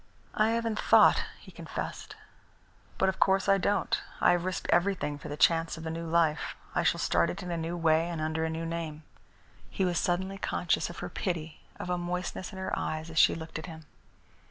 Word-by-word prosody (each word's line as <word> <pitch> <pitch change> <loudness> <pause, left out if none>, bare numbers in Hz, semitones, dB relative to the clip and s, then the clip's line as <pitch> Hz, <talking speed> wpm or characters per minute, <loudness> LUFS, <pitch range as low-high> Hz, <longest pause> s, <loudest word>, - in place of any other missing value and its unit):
"I 215 +1 +3
haven't 230 -1 -1
thought," - - +5
he - - -14
confessed. - - -6 0.8
"But 190 - +2
of 190 - -1
course 195 0 +3
I 195 0 +5
don't. 200 -1 +1 0.2
I - - +5
have 175 0 +1
risked 185 0 -3
everything 175 -5 +1
for 150 - -8
the 145 - -5
chance 165 0 +3
of 160 - -8
a 160 - -2
new 165 +1 -4
life. 160 -2 +1 0.2
I - - +2
shall - - +2
start - - +2
it 195 +1 -5
in 180 - -5
a - - -1
new 165 +1 -3
way 165 0 +3
and 170 -2 -4
under 155 +1 -1
a 160 - 0
new 160 +1 -3
name." 165 -2 -4 0.7
He 190 - 0
was 175 -2 +1
suddenly 190 +2 -1
conscious 175 -2 0
of 175 - -9
her - - -5
pity, 165 -4 -3 0.2
of 180 - -4
a 180 - 0
moistness 180 +2 -4
in 190 - -9
her 190 - -4
eyes 155 +1 -3
as 160 - +1
she - - +6
looked 160 -1 -6
at 160 - -8
him. 160 -2 -10
170 Hz, 215 wpm, -29 LUFS, 160-185 Hz, 0.8 s, she